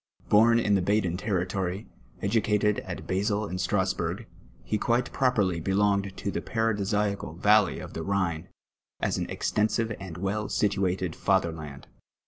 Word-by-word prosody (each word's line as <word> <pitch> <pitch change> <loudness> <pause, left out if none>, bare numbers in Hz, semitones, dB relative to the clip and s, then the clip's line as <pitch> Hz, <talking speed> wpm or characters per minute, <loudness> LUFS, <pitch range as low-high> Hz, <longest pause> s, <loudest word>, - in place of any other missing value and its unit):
Bom 115 +3 +6
in 105 -3 +2
the 95 - +3
leaden 95 -2 +1
territory', 95 0 -2 0.4
edu 105 +3 +2
cated 105 0 +1
at - - -5
Basle 100 +3 0
and 90 -2 -5
Strasburi^. 95 +1 -1 0.4
he 105 - -1
quite 120 +3 0
j)roj)(rly 105 -10 +1
belon^vl 100 +1 +1
to 100 - -3
the - - -3
paradisiacal 105 -5 -1
valley 105 +1 +4
of - - -8
tlie 80 - -5
Kliine, 90 -4 -1 0.5
as - - 0
an - - -3
extensive 110 +1 0
and 95 -4 -8
well 100 +3 -2
situated 95 -4 0
fatherland. 80 -7 -1
100 Hz, 140 wpm, -27 LUFS, 90-105 Hz, 0.5 s, Bom